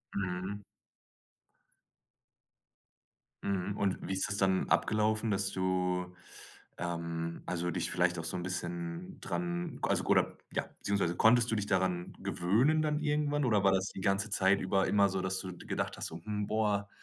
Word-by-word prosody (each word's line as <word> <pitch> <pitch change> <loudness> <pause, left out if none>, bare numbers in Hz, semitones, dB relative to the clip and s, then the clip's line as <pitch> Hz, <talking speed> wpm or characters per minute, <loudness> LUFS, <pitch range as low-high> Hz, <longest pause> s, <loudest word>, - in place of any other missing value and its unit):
Mhm. 95 +1 -3 2.8
Mhm, 100 +1 -1
und 100 -2 +1
wie 95 - -1
ist 95 - 0
das 100 - -2
dann 95 -1 +2
abgelaufen, 110 +1 +2
dass 100 -1 0
du, 90 -1 -1 0.6
ähm, 85 -1 -3
also 90 0 -1
dich - - -1
vielleicht 90 0 +2
auch - - -4
so 80 - -3
'n 90 - -4
bisschen 85 -1 -4
dran 85 -1 -3
k - - 0
also - - +2
k - - -6
oder - - +3 0.2
ja - - 0 0.2
beziehungsweise 100 -4 0
konntest 115 +1 +5
du - - +2
dich 105 -1 -1
daran 90 -2 0
gewöhnen 125 - +2
dann 150 -1 +1
irgendwann 145 -1 +1
oder 105 -4 +3
war 95 - +5
das 95 0 +1
die 95 - -8
ganze 100 +3 +1
Zeit 95 -1 +3
über 95 +1 +2
immer 100 -1 +4
so, 95 0 -1
dass 95 0 -1
du 95 -1 -6
gedacht - - -3
hast: - - -4
„Hm, 105 +5 -4
boah, 105 -2 0
95 Hz, 165 wpm, -32 LUFS, 90-105 Hz, 2.8 s, konntest